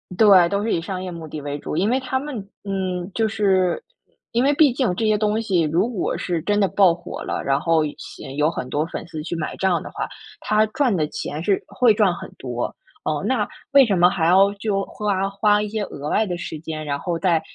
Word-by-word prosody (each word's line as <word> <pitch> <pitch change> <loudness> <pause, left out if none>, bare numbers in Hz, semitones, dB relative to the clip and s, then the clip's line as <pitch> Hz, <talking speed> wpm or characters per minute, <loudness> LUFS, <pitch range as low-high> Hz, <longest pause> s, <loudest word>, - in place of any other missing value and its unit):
对， 195 -4 +7
都 200 +2 -1
是 225 - 0
以 165 - 0
商 185 +1 -5
业 185 - -5
目 165 -2 -8
的 155 0 -6
为 145 0 -4
主。 - - -5
因 190 +6 +1
为 255 +2 +2
它 260 0 -2
们， 260 -8 -6 0.2
嗯， 190 -2 -3
就 225 -1 +1
是 190 -4 +1 0.5
因 235 +2 +2
为 285 +2 +4
毕 290 -1 +5
竟 240 -7 0
这 225 - -1
些 215 -1 +3
东 215 +1 +1
西 190 -6 +1
如 170 +8 +1
果 220 -7 -2
是 175 -3 -2
真 205 +3 +1
的 195 - +4
爆 190 -3 +4
火 170 - -8
了， - - -3
然 135 0 +1
后 165 0 +2
吸 - - -10
引 135 - -8
有 150 +1 +3
很 130 -6 -5
多 150 +2 0
粉 - - -6
丝 160 -2 -6
去 170 - -4
买 160 -2 -4
账 190 -3 +1
的 - - -8
话， - - -4 0.3
它 215 0 +2
赚 240 0 +1
的 155 -4 +1
钱 150 +1 -5
是 195 0 +1
会 245 -4 +3
赚 205 -4 +3
很 - - -9
多。 120 -2 -4 0.4
嗯 150 -1 -2
那， 245 -5 +1 0.2
为 275 -1 +7
什 200 -5 +1
么 175 +1 +6
还 165 -3 0
要 195 +3 +5
就 200 -1 -1
花 195 -2 -1
花 205 +1 +2
一 210 - -3
些 215 0 -3
额 145 -6 -6
外 220 - +2
的 180 -3 -3
时 160 -2 -6
间， 155 -1 -6
然 140 -1 -2
后 170 +1 -2
再 170 -1 +2
190 Hz, 260 characters per minute, -22 LUFS, 165-215 Hz, 0.5 s, 对